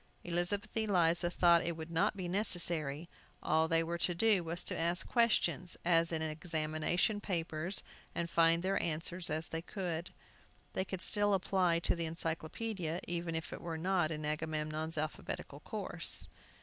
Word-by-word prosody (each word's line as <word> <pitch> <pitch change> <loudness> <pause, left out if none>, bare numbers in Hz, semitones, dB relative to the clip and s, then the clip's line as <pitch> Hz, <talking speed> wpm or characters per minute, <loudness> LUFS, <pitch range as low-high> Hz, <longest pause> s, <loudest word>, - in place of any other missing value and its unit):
Elizabeth 175 +4 -1
Eliza 175 -6 +2
thought 170 -1 +4
it 170 -1 -3
would 160 +1 -7
not 165 +4 +1
be 185 -2 -4
necessary. 170 -5 +1 0.4
All 160 +1 +2
they 165 0 +2
were 170 +1 -4
to 175 0 +1
do 205 -1 +3
was 170 +2 0
to - - -3
ask 170 +1 +1
questions, 200 -7 +1
as 170 -1 +3
in 160 -1 -1
examination 160 +5 -1
papers, 170 -1 0 0.3
and 170 - -2
find 165 0 +3
their 195 +1 0
answers 170 +2 0
as 155 +1 -3
they 165 - -4
could. 175 -2 -5 0.6
They 190 - -1
could 190 -2 -5
still 205 +1 +7
apply 185 -2 +1
to - - +3
the 170 -1 -3
Encyclopædia, 165 +2 -4
even 170 -1 -3
if 160 0 -4
it - - -8
were 165 -2 -4
not 180 -1 +1
in 155 -2 -4
Agamemnon's 155 +1 -3
alphabetical 155 0 -5
course. - - -1
170 Hz, 160 wpm, -33 LUFS, 160-180 Hz, 0.6 s, still